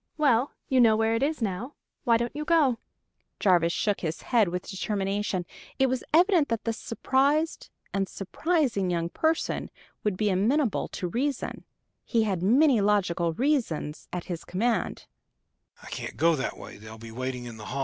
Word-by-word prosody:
"Well, 270 -4 +3 0.2
you 260 -2 +4
know 220 -2 +5
where 225 0 +2
it 230 - 0
is 290 -2 0
now; 215 +7 -3 0.3
why 230 -1 +5
don't 235 +3 -3
you 300 - -3
go?" 300 -8 +3 0.6
Jarvis 175 -4 +4
shook 205 +2 0
his 160 -2 -3
head 230 -5 +3
with 180 +1 -4
determination: 195 -1 -2 0.3
it 265 -1 +3
was 255 0 -1
evident 345 -1 +4
that 230 -2 -1
this 225 -1 -2
surprised 280 +7 0 0.2
and 195 -1 0
surprising 235 - 0
young 170 -1 -1
person 320 - 0 0.3
would 210 -3 0
be 210 0 +1
amenable 225 +6 +1
to 180 - -4
reason 265 +8 -2 0.4
he 230 -2 +1
had 195 -5 -1
many 250 - +4
logical 180 -5 +1
reasons 225 - -1
at 180 -1 -3
his 175 -3 -5
command. 225 +6 -1
225 Hz, 135 wpm, -27 LUFS, 190-270 Hz, 0.6 s, know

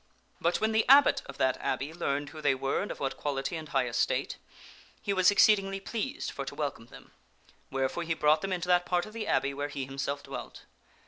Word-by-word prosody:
But 170 +1 +1
when 220 0 +1
the 220 0 +3
abbot 280 +1 +7
of 140 - -9
that 130 -1 +2
abbey 145 +4 -2
learned 145 -4 -2
who 155 +1 -10
they 145 -2 +3
were 135 +1 -1
and 205 - -4
of - - -6
what 135 -1 -2
quality 145 +3 -2
and 155 -2 -7
high 135 -2 +1
estate, 120 -1 -1 0.6
he 200 - -2
was 185 0 +5
exceedingly 195 -1 +4
pleased 235 +7 -4
for 140 - -5
to 135 - -7
welcome 140 -6 -4
them, - - -15 0.6
wherefore 135 +5 -1
he 165 -1 -1
brought 155 0 +3
them 195 - -3
into 180 -1 -2
that 180 0 +3
part 175 -1 +1
of 215 - -12
the 225 -2 -4
abbey 140 0 +1
where 145 +1 -3
he 140 -2 -4
himself 140 +1 -4
dwelt. - - -8
155 Hz, 215 wpm, -29 LUFS, 140-195 Hz, 0.6 s, abbot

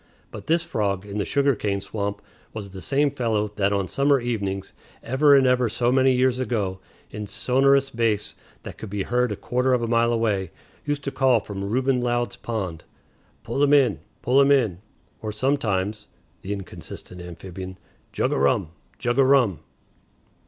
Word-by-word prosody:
But - - -9
this 165 +1 +2
frog 100 - -2
in 105 0 -5
the 100 - 0
sugar 140 -1 +2
cane 100 -3 -1
swamp 100 0 -4 0.3
was 100 -3 -6
the 95 -1 -9
same 140 +6 +1
fellow 110 -6 0
that 100 -1 +2
on 100 -2 0
summer 140 +4 +2
evenings, 100 -5 -3 0.3
ever 140 +3 +4
and 135 -1 +5
ever 125 -2 +3
so 120 +3 +1
many 130 0 +4
years 130 0 +2
ago, 105 -7 -1 0.3
in 105 0 -6
sonorous 135 +4 +2
bass 115 -3 0 0.3
that - - -9
could 110 - -7
be 100 0 -2
heard 125 +1 +1
a - - -1
quarter 125 +6 0
of 120 -2 +1
a - - -1
mile 115 0 +3
away, 105 -6 0 0.4
used 145 -1 -2
to 140 - -3
call 130 -4 +3
from 100 -1 -6
Reuben 125 +5 +1
Loud's 120 0 -1
pond, 95 -8 -4 0.6
"Pull 140 - -2
him 145 0 +4
in! 140 -4 +4 0.2
Pull 130 +3 +4
him 140 - +4
in!" 115 -11 +2 0.4
or 110 - -3
sometimes 105 -4 -1 0.3
(the 95 - -6
inconsistent 95 -2 -8
amphibian), 90 +2 -8 0.3
"Jug - - 0
o' - - 0
rum! 75 +5 +1 0.3
Jug 120 +1 -1
o' - - +7
rum!" 130 - +3
115 Hz, 175 wpm, -24 LUFS, 100-130 Hz, 0.6 s, o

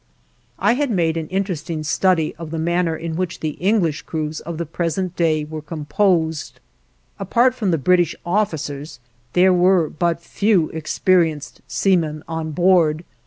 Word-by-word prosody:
I - - +3
had 285 +2 0
made 170 -6 +1
an 160 -1 -3
interesting 170 -4 -3
study 165 +1 +1
of 165 -1 -7
the 165 - -4
manner 170 0 0
in 165 0 -5
which 180 0 -3
the 155 - -2
English 180 -6 +1
crews 155 -1 -4
of 170 0 -6
the 170 - -3
present 175 +3 -2
day 155 -3 +1
were 155 +1 -6
composed. 160 +1 -1 0.6
Apart 250 +2 +2
from 220 -6 -2
the 165 - +2
British 175 +3 +2
officers 160 -7 -2 0.3
there 185 +1 +5
were 180 -3 +3
but 170 +1 -1
few 190 -1 +1
experienced 160 -1 0
seamen 160 -6 0
on 160 -1 -3
board. 170 -2 +3
165 Hz, 150 wpm, -20 LUFS, 155-185 Hz, 0.6 s, there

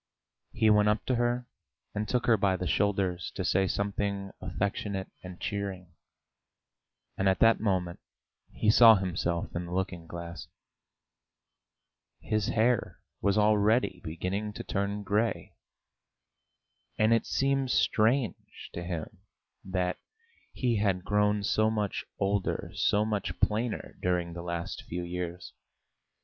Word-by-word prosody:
He 110 -1 +3
went 105 0 +5
up 105 0 0
to 130 - +1
her 120 +1 0 0.5
and 105 +1 -3
took 125 -1 +1
her 115 - +5
by 95 -2 +1
the 90 - -3
shoulders 95 -2 0
to 95 - -2
say 95 +2 +2
something 100 0 -2
affectionate 95 +1 -3
and 90 -1 -9
cheering, 95 -4 -4 1.2
and 95 0 +2
at 95 - +2
that 115 0 +6
moment 95 -5 -1 0.5
he 105 - +2
saw 115 0 +9
himself 90 -3 -2
in 85 0 -3
the - - -8
looking 90 -3 -3
glass. 85 -1 -7 1.7
His 110 -2 -1
hair 115 +1 +1 0.2
was 100 0 +2
already 105 -2 +3
beginning 95 +6 -3
to - - -6
turn 100 +1 -2
grey. 105 +4 -1 1.4
And 110 +1 +4
it 115 - +1
seemed 135 -1 +1
strange 115 -2 +1
to 85 - -5
him 85 -3 -5 0.4
that 90 -1 -1 0.5
he 120 -3 0
had 95 -3 +1
grown 105 0 +2
so 110 +2 +2
much 105 -2 -2
older, 100 0 -1
so 105 +1 +2
much 105 -3 -2
plainer 110 +2 -1
during 90 -2 0
the 85 - -6
last 85 -1 -4
few 90 +1 -5
years. 90 0 -5
100 Hz, 130 wpm, -29 LUFS, 90-110 Hz, 1.7 s, saw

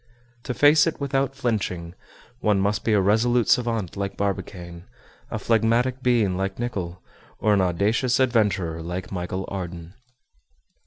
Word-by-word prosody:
To 125 - -3
face 150 +4 +5
it 165 - -2
without 135 -1 -1
flinching, 95 -10 -2 0.5
one 105 -4 +2
must 100 +2 0
be 110 - +1
a 105 - +4
resolute 110 +4 +2
savant 115 -7 +1
like 100 0 -4
Barbicane, 90 -3 -4 0.4
a 110 - -3
phlegmatic 115 +4 +1
being 115 -7 +2
like 95 +1 -2
Nicholl, 95 -7 -4 0.3
or 105 0 +2
an 100 - +3
audacious 105 +8 +1
adventurer 105 -10 +1
like 90 +2 -5
Michel 95 +1 -3
Ardan. 90 -3 -6
105 Hz, 140 wpm, -24 LUFS, 90-120 Hz, 0.5 s, face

